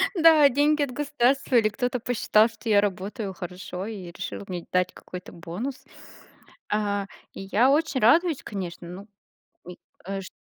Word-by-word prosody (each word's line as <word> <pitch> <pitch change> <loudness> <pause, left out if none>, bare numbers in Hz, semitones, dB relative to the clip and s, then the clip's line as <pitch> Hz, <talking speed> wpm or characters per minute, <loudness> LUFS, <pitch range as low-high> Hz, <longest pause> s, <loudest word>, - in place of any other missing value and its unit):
да, 320 -3 +7
деньги 290 +3 +2
от 265 - -3
государства 275 -2 +1
или 215 -2 +5
кто-то 245 +3 -2
посчитал, 220 -2 +3
что 225 0 -8
я 205 -1 +6
работаю 200 +1 -3
хорошо 180 +1 -7
и 190 -6 -7
решил 190 - -6
мне 180 -2 -5
дать 180 0 +1
какой-то 180 0 -10
бонус. 185 +11 -6 0.9
А, 205 -1 0 0.3
и - - -8
я 250 +6 +4
очень 300 -2 +1
радуюсь, 320 +7 +4
конечно, 175 -4 -6
ну, 195 +4 -9 0.6
ми 180 0 -10 0.3
э 195 0 -2
шт 185 - -10
215 Hz, 155 wpm, -25 LUFS, 185-265 Hz, 0.9 s, да